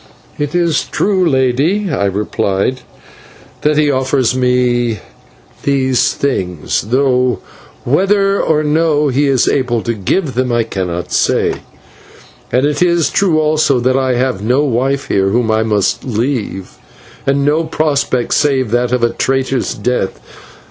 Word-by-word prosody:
"It 145 Hz, +2 st, -2 dB
is 170 Hz, -3 st, +1 dB
true, 190 Hz, -4 st, +1 dB
Lady," 140 Hz, +9 st, +1 dB
I 100 Hz, -, 0 dB
replied, 100 Hz, +4 st, -1 dB, 0.8 s
"that 150 Hz, 0 st, +1 dB
he 150 Hz, -1 st, +3 dB
offers 130 Hz, -2 st, +1 dB
me 125 Hz, -2 st, +1 dB, 0.6 s
these 130 Hz, -3 st, +1 dB
things 90 Hz, -, -2 dB
though 125 Hz, -1 st, +2 dB, 0.5 s
whether 195 Hz, +7 st, +2 dB
or 155 Hz, -1 st, +1 dB
no 150 Hz, -1 st, +1 dB
he 140 Hz, +3 st, +1 dB
is 135 Hz, -3 st, +2 dB
able 120 Hz, -4 st, 0 dB
to 115 Hz, -, -1 dB
give 130 Hz, -, -1 dB
them 125 Hz, 0 st, -1 dB
I 120 Hz, -1 st, +2 dB
cannot 90 Hz, -5 st, -4 dB
say; -, -, +1 dB, 0.9 s
and 125 Hz, +3 st, +2 dB
it 145 Hz, +1 st, -1 dB
is 170 Hz, -2 st, +2 dB
true 180 Hz, -6 st, +2 dB
also 155 Hz, -3 st, +2 dB
that 130 Hz, +2 st, +1 dB
I 130 Hz, -1 st, +1 dB
have 125 Hz, -5 st, -1 dB
no 125 Hz, +7 st, +1 dB
wife 135 Hz, +1 st, -1 dB
here 95 Hz, 0 st, +1 dB
whom 115 Hz, +2 st, +1 dB
I 110 Hz, 0 st, +2 dB
must 105 Hz, -3 st, 0 dB
leave, 115 Hz, -5 st, -3 dB, 0.5 s
and 140 Hz, 0 st, +1 dB
no 155 Hz, +3 st, +2 dB
prospect 145 Hz, -6 st, 0 dB
save 135 Hz, -6 st, +1 dB
that 120 Hz, 0 st, +1 dB
of 125 Hz, -1 st, 0 dB
a 120 Hz, -, +4 dB
traitor's 135 Hz, -1 st, -1 dB
death. 105 Hz, -2 st, -2 dB
130 Hz, 140 wpm, -15 LUFS, 120-150 Hz, 0.9 s, a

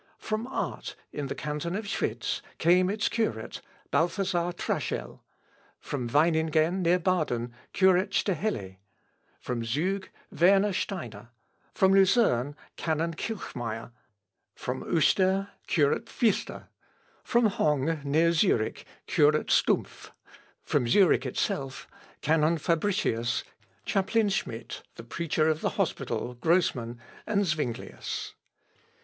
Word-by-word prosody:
From 220 Hz, +2 st, -3 dB
Art, 265 Hz, -, -4 dB, 0.2 s
in 145 Hz, -1 st, -3 dB
the -, -, -4 dB
canton 150 Hz, +4 st, -3 dB
of 215 Hz, +1 st, -3 dB
Schwitz, 200 Hz, -, -2 dB, 0.2 s
came 180 Hz, +3 st, +4 dB
its 210 Hz, +1 st, 0 dB
curate, 115 Hz, -, -2 dB, 0.3 s
Balthasar 175 Hz, 0 st, +1 dB
Traschel; -, -, -3 dB, 0.6 s
from 130 Hz, -4 st, -4 dB
Weiningen 160 Hz, +4 st, +2 dB
near 175 Hz, +1 st, +4 dB
Baden, 155 Hz, -10 st, 0 dB, 0.2 s
curate 190 Hz, 0 st, +4 dB
Staheli; 180 Hz, -, -1 dB, 0.6 s
from 120 Hz, -2 st, -3 dB
Zug, 175 Hz, -, -1 dB, 0.2 s
Werner 195 Hz, +3 st, +4 dB
Steiner; 120 Hz, -, -4 dB, 0.5 s
from 190 Hz, 0 st, +4 dB
Lucerne, 190 Hz, -, +3 dB, 0.2 s
canon 165 Hz, +1 st, -1 dB
Kilchmeyer; 120 Hz, -, -5 dB, 0.6 s
from -, -, -4 dB
Uster, 195 Hz, +1 st, +2 dB, 0.2 s
curate 145 Hz, -4 st, +1 dB
Pfister; 225 Hz, -4 st, -1 dB, 0.5 s
from 240 Hz, -2 st, +3 dB
Hongg, 150 Hz, -5 st, 0 dB
near 160 Hz, +4 st, +3 dB
Zurich, 160 Hz, -, +1 dB, 0.2 s
curate 150 Hz, +1 st, +3 dB
Stumpff; -, -, +1 dB, 0.5 s
from 120 Hz, -, +1 dB
Zurich 140 Hz, -, +4 dB
itself, 135 Hz, +1 st, -3 dB, 0.3 s
canon 160 Hz, +2 st, +3 dB
Fabricius, 165 Hz, -, 0 dB, 0.4 s
chaplain 205 Hz, +2 st, +1 dB
Schmid, 120 Hz, -, -3 dB, 0.2 s
the -, -, -9 dB
preacher 155 Hz, +5 st, 0 dB
of 155 Hz, 0 st, +1 dB
the -, -, -2 dB
hospital, 125 Hz, -, -1 dB
Grosmann, 125 Hz, -5 st, +1 dB, 0.3 s
and 205 Hz, -2 st, +2 dB
Zuinglius. 150 Hz, -8 st, -3 dB
165 Hz, 105 wpm, -28 LUFS, 140-195 Hz, 0.6 s, came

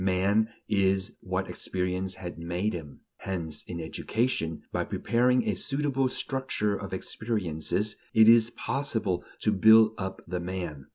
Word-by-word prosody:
Man 100 Hz, +4 st, +2 dB, 0.2 s
is 95 Hz, -2 st, +1 dB
what -, -, -2 dB
experience 95 Hz, 0 st, -2 dB
has 90 Hz, -1 st, -6 dB
made 85 Hz, +6 st, -2 dB
him; 80 Hz, -5 st, -8 dB, 0.2 s
hence, 85 Hz, -6 st, -3 dB
in 85 Hz, -2 st, -5 dB
education, 85 Hz, +1 st, -2 dB
by -, -, 0 dB
preparing 125 Hz, +2 st, +1 dB
a 105 Hz, -, +2 dB
suitable 135 Hz, +5 st, 0 dB
structure 130 Hz, -6 st, -1 dB
of 100 Hz, -1 st, -6 dB
experiences, 95 Hz, -1 st, -2 dB
it 110 Hz, 0 st, +6 dB
is 115 Hz, 0 st, +7 dB
possible 120 Hz, -9 st, -2 dB, 0.2 s
to 110 Hz, -, +2 dB
build 110 Hz, +2 st, +6 dB
up 95 Hz, 0 st, -5 dB
the 90 Hz, +1 st, -2 dB
man. 85 Hz, -6 st, -5 dB
95 Hz, 135 wpm, -28 LUFS, 90-110 Hz, 0.2 s, is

